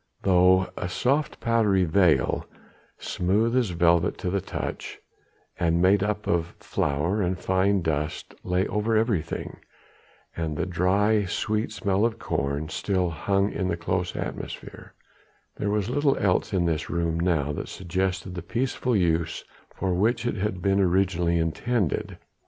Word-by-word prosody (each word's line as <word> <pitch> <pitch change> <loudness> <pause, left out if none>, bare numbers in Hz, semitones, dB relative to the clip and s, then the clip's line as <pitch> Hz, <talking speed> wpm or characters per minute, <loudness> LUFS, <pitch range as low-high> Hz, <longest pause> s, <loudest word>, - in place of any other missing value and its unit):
Though 95 0 +4
a 90 - -4
soft 135 +9 0
powdery 110 -5 +2
veil 85 0 +2 0.5
smooth 105 +7 0
as 125 -5 +2
velvet 85 0 +2
to 90 - -3
the 100 0 0
touch - - -5 0.6
and 85 -1 +2
made 95 +3 +4
up 105 +1 -1
of 85 -1 -1
flour 80 +9 -1
and 90 0 0
fine 95 +1 +1
dust 75 -1 -2
lay 90 +1 +1
over 105 +2 0
everything, 110 -7 -1 0.8
and 80 -2 -3
the 85 - 0
dry, 100 +4 +2
sweet 110 +4 -1
smell 100 -1 0
of 115 -1 +1
corn 70 -2 -2
still 90 -4 -1
hung 100 +5 0
in 95 - -2
the 85 - -1
close 90 +2 -2
atmosphere, - - -7 0.6
there 105 - -1
was 105 -1 0
little 140 +2 +1
else 90 -3 +1
in 90 -3 +1
this 80 -1 -1
room 85 -1 -1
now 80 -5 +1
that 75 - -5
suggested 95 0 -2
the 90 - -5
peaceful 125 +5 -1
use 85 -4 0 0.3
for 95 -1 -1
which 115 +6 +1
it 120 - 0
had 95 -3 -2
been 100 0 +2
originally 90 -2 +2
intended. 90 +4 -1
95 Hz, 145 wpm, -26 LUFS, 85-105 Hz, 0.8 s, Though